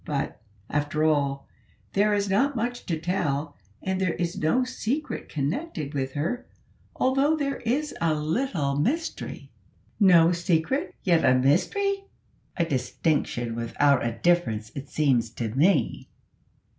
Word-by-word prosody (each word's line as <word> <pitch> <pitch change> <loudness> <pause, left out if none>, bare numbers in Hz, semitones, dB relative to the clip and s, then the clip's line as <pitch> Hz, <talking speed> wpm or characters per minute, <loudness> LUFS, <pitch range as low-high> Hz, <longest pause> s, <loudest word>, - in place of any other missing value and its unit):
But, 140 -7 -3 0.3
after 150 +1 -1
all, 140 -3 +1 0.5
there 210 +2 +3
is 200 0 0
not 265 +9 +2
much 240 +1 -3
to 165 -3 -1
tell, 150 -4 -1 0.3
and 190 0 -1
there 180 -3 +1
is 175 -1 -2
no 160 +12 +2
secret 255 +4 -3
connected 155 - -3
with 135 -2 -2
her, 165 - -2 0.5
although 275 +4 +2
there 275 -2 -1
is 275 +6 -1
a 165 -2 +2
little 155 - -1
mystery." 315 - -2 0.5
"No 175 -5 +6
secret, 175 - 0
yet 170 -3 +3
a 130 - +5
mystery! 390 - +1 0.5
a 170 - +2
distinction 130 -3 -1
without 125 +4 +2
a 115 -1 -1
difference, 115 -12 +1
it 140 0 -7
seems 130 -7 +2
to 115 -2 -3
me." 150 - +1
165 Hz, 130 wpm, -26 LUFS, 140-230 Hz, 0.5 s, No